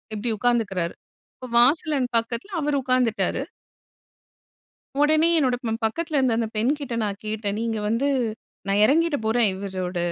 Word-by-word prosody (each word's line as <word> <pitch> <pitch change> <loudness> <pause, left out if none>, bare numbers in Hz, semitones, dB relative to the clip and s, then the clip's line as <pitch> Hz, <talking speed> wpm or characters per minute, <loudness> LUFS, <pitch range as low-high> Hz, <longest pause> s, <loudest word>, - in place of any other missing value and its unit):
இப்டி 225 +3 -3
உட்கார்ந்துகிறாரு. 205 -7 0 0.4
இப்போ 255 - -9
வாசலின் 280 0 +3
பக்கத்துல 235 - -3
அவர் 295 0 0
உட்கார்ந்துட்டாரு. 250 -3 +1 1.6
உடனே 310 +2 +4
என்னோட 255 -5 +2
ப - - -1 0.2
பக்கத்துல 315 +6 -1
இருந்த 250 -4 +2
அந்த 230 -1 0
பெண்கிட்ட 265 +2 -1
நான் 200 -1 -3
கேட்டேன், 210 -1 -3
"நீங்க 225 -2 -2
வந்து, 230 +6 +1 0.6
நான் 200 +1 +2
இறங்கிட 325 +3 +3
போறேன், 225 0 +3
இவரோட, 185 -2 -4
235 Hz, 130 wpm, -24 LUFS, 215-280 Hz, 1.6 s, உடனே